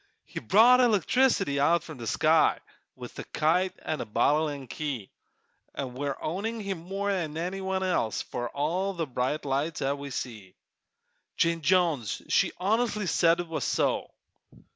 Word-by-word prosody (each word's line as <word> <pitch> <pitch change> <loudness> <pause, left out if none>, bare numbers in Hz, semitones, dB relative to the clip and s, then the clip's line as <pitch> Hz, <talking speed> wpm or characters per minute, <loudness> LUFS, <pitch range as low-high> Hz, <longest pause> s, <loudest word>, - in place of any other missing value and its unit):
He - - -6
brought 230 - +6
electricity 220 - +2
out 170 +5 +2
of 155 -4 -8
the 115 - -6
sky, - - +3 0.4
With - - -10
a - - -4
kite 180 +4 +1
an' 155 - -2
a - - -4
bottle 150 +8 +2
an' 140 -2 -6
key, 130 -6 -5 0.6
An' 130 -3 -4
we're 140 +1 -3
owing 210 +8 -3
him 195 -4 -4
more'n 185 -3 -3
any 180 +4 -3
one 190 0 -1
else 175 - 0
For 120 -1 -4
all 175 +7 -1
the 170 -3 -2
bright 130 +3 -2
lights 145 +4 -1
'at 140 +1 -1
we 140 0 -6
see. 110 -7 -6 0.8
Jane 170 0 +1
Jones 160 - +1
she - - +3
honestly 215 +2 0
said 170 -1 +3
it 175 - -8
was 165 -1 -3
so! - - 0
165 Hz, 160 wpm, -28 LUFS, 140-190 Hz, 0.8 s, brought